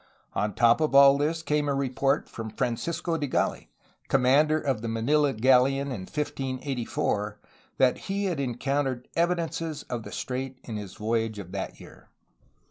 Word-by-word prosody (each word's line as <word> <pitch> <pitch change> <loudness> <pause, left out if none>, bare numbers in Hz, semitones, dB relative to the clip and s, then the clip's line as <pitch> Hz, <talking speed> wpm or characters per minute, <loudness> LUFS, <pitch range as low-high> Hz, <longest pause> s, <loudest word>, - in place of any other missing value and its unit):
On 105 -1 -1
top 120 +4 +4
of 150 -3 +1
all 140 0 +8
this 155 +3 -1
came 150 -2 0
a 140 - +1
report 135 +1 0
from 110 -1 -6
Francisco 160 - -2
de 145 - -1
Gali, - - -1 0.4
commander 140 +4 +4
of 135 -7 -1
the 115 - -4
Manila 140 +6 +2
galleon 135 +3 +3
of 95 -7 -6
1584, 130 -7 -2 0.4
that 130 -1 +4
he 200 +1 0
had 175 -6 -1
encountered 135 0 -1
evidences 165 -2 -1
of 120 -2 -2
the - - -9
strait 130 0 -4
in 115 - -6
his 105 -3 -6
voyage 110 0 -1
of 95 -3 -8
that - - -5
year. - - -15
135 Hz, 155 wpm, -27 LUFS, 115-150 Hz, 0.4 s, all